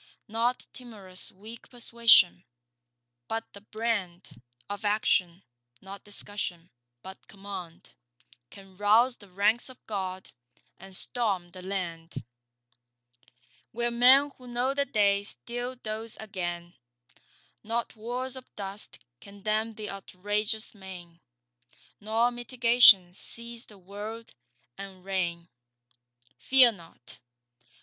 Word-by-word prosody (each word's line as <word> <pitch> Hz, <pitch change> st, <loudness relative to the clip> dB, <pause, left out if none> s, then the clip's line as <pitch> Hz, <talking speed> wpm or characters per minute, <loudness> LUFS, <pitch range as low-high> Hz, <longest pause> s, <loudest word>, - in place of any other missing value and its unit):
Not 235 Hz, +3 st, 0 dB
timorous 205 Hz, -8 st, -3 dB
weak 220 Hz, +4 st, -11 dB
persuasion, 230 Hz, -7 st, +5 dB, 0.8 s
but 225 Hz, 0 st, -2 dB
the 200 Hz, -, -11 dB
brand 205 Hz, -, -3 dB, 0.3 s
Of 205 Hz, +1 st, -6 dB
Action—not 180 Hz, -, -2 dB
discussion, 200 Hz, -4 st, -5 dB, 0.3 s
but 190 Hz, +1 st, -11 dB
command— 195 Hz, -4 st, -9 dB, 0.6 s
Can 195 Hz, -1 st, -15 dB
rouse 225 Hz, +5 st, +4 dB
the 205 Hz, -, -16 dB
ranks 205 Hz, +7 st, +2 dB
of 255 Hz, -, -12 dB
God 190 Hz, -3 st, -4 dB, 0.5 s
and 190 Hz, 0 st, -6 dB
storm 195 Hz, -6 st, +1 dB
the 185 Hz, -, -10 dB
land, 170 Hz, -6 st, -5 dB, 1.5 s
Where 240 Hz, +1 st, 0 dB
men 260 Hz, +4 st, +7 dB
who 250 Hz, -, -12 dB
know 245 Hz, +2 st, 0 dB
the 280 Hz, 0 st, +2 dB
day 200 Hz, -5 st, +3 dB
still 245 Hz, +4 st, -3 dB
doze 220 Hz, -2 st, -6 dB
again; 175 Hz, -5 st, -5 dB, 0.9 s
Not 230 Hz, +2 st, -2 dB
walls 245 Hz, +4 st, -4 dB
of 260 Hz, -1 st, -10 dB
dust 200 Hz, 0 st, -4 dB, 0.2 s
can 200 Hz, +3 st, -14 dB
dam 215 Hz, +1 st, 0 dB
th' 215 Hz, -1 st, -6 dB
outrageous 205 Hz, +3 st, -2 dB
main, 180 Hz, -4 st, -11 dB, 0.8 s
Nor 225 Hz, +3 st, +2 dB
mitigation 240 Hz, -6 st, +6 dB
seize 235 Hz, +4 st, -8 dB
the 210 Hz, -, -15 dB
world 210 Hz, +4 st, -8 dB, 0.5 s
and 190 Hz, -2 st, -9 dB
reign. 175 Hz, -3 st, -2 dB, 0.9 s
Fear 260 Hz, -2 st, +7 dB
not. 165 Hz, -, -14 dB
205 Hz, 105 wpm, -28 LUFS, 185-235 Hz, 1.5 s, men